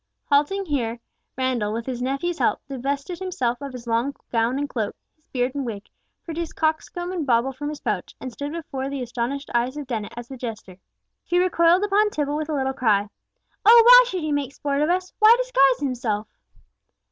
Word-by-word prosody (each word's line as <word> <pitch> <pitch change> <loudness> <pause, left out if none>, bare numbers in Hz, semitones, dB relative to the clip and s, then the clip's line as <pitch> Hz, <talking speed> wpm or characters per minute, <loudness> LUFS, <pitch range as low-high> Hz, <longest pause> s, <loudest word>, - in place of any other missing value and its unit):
Halting 300 +8 +2
here, 240 -7 -2 0.4
Randall, 250 -5 0
with 230 +1 -4
his 250 -2 -4
nephew's 275 +7 -2
help, - - +2
divested 280 +5 -3
himself 265 -10 -2
of 280 -1 -5
his 250 -2 -9
long 235 +4 0 0.2
gown 230 +2 +1
and 290 +1 -1
cloak, 225 -6 -3 0.2
his 310 - -41
beard 250 0 -1
and 285 -1 -3
wig, 210 -5 -6 0.4
produced 330 -1 -5
cockscomb 320 +3 -1
and 345 -4 -2
bauble 255 0 +2
from 290 +3 -5
his 300 -1 -7
pouch, - - -3
and 255 -2 -7
stood 285 +3 -5
before 275 -5 -5
the 275 -2 -3
astonished 250 +4 -4
eyes 245 +4 0
of 295 - -5
Dennet 225 -5 -4
as 240 -1 -7
the 265 - -9
jester! 220 -6 -7 0.5
She 355 - 0
recoiled 355 0 +4
upon 415 +1 +3
Tibble 295 -6 -2
with 310 +1 -3
a 305 - -1
little 265 -1 0
cry, 210 -5 +1 0.5
"Oh, 460 +2 +9
why - - +10
should 370 -5 -3
he 310 - -1
make 285 -2 -1
sport 285 0 -1
of 305 - +2
us? 365 +1 -1
Why 440 +1 +8
disguise 275 - +3
himself?" 235 -6 -2
275 Hz, 195 wpm, -23 LUFS, 245-325 Hz, 0.5 s, why